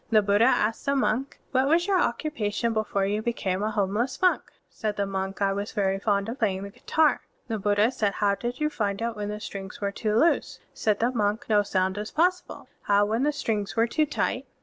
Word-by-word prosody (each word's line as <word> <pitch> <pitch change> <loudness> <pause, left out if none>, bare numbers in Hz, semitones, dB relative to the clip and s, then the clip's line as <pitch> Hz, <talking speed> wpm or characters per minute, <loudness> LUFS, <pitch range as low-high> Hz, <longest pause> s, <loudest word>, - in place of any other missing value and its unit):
The 215 -2 +4
Buddha 205 +3 +4
asked 225 -1 +1
the 280 - +2
monk, 265 0 0
"What 260 0 +2
was 335 +4 +3
your 380 -2 +2
occupation 235 -4 -1
before 215 -3 0
you 205 +2 -1
became 200 -5 -2
a 215 - 0
homeless 215 +5 -1
monk?*' 365 -1 +2 0.2
Said 215 -1 -4
the 200 - +1
monk, 195 0 -3
"I 195 0 +2
was 200 +1 -4
very 195 -1 0
fond 200 -1 0
of 235 +4 -5
playing 195 -4 0
the 200 - -7
guitar." 310 +8 +1 0.3
The 225 -3 -2
Buddha 205 +3 +2
said, 205 -5 0
"How 205 -2 +1
did 240 +5 -4
you 300 0 0
find 200 -6 -2
it 230 0 -2
when 205 -1 -4
the 210 0 -4
strings 195 -2 -7
were 200 -1 -1
too 210 +1 -1
loose?" 330 +7 +2
Said 210 -1 0
the 240 +2 +2
monk, 210 -2 0
"No 210 -1 +5
sound 190 0 0
is 210 - -4
possible." 360 +3 -1
"How 205 0 +3
when 220 +3 0
the 295 +2 +2
strings 215 -7 -2
were 230 0 +4
too 305 +6 +1
tight?" 275 -2 -2
215 Hz, 220 wpm, -26 LUFS, 200-245 Hz, 0.3 s, No